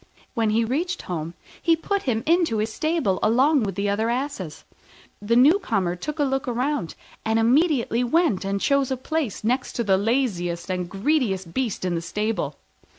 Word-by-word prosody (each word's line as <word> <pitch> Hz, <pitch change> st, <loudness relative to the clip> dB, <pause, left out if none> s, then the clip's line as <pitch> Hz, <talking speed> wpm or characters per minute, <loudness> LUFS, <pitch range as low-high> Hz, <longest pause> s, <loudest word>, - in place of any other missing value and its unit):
When 225 Hz, -3 st, +1 dB
he 225 Hz, +2 st, +2 dB
reached 340 Hz, +9 st, -2 dB
home, 170 Hz, -1 st, -5 dB, 0.3 s
he 335 Hz, -1 st, +4 dB
put 400 Hz, +5 st, -2 dB
him 230 Hz, -3 st, -1 dB
into 335 Hz, -7 st, +2 dB
his 215 Hz, +1 st, -1 dB
stable 310 Hz, -, 0 dB
along 265 Hz, +6 st, +4 dB
with 195 Hz, -4 st, -2 dB
the 200 Hz, +1 st, -1 dB
other 215 Hz, +3 st, 0 dB
asses. 240 Hz, -, -3 dB, 0.6 s
The 220 Hz, +3 st, +1 dB
newcomer 235 Hz, -, +3 dB
took 300 Hz, -, -5 dB
a 295 Hz, -, +2 dB
look 270 Hz, -1 st, -1 dB
round, 250 Hz, -, -1 dB, 0.3 s
and 220 Hz, 0 st, +1 dB
immediately 250 Hz, 0 st, +2 dB
went 245 Hz, -, +2 dB
and 200 Hz, +1 st, -1 dB
chose 280 Hz, +3 st, +2 dB
a 265 Hz, -, -1 dB
place 280 Hz, -, -3 dB
next 250 Hz, +4 st, 0 dB
to 235 Hz, -, -1 dB
the 195 Hz, -3 st, +3 dB
laziest 195 Hz, -7 st, -1 dB
and 180 Hz, -1 st, -2 dB
greediest 195 Hz, -, 0 dB
beast 240 Hz, -8 st, -2 dB
in 180 Hz, -, 0 dB
the 165 Hz, -, -1 dB
stable. 205 Hz, -4 st, -2 dB
230 Hz, 175 wpm, -24 LUFS, 195-280 Hz, 0.6 s, he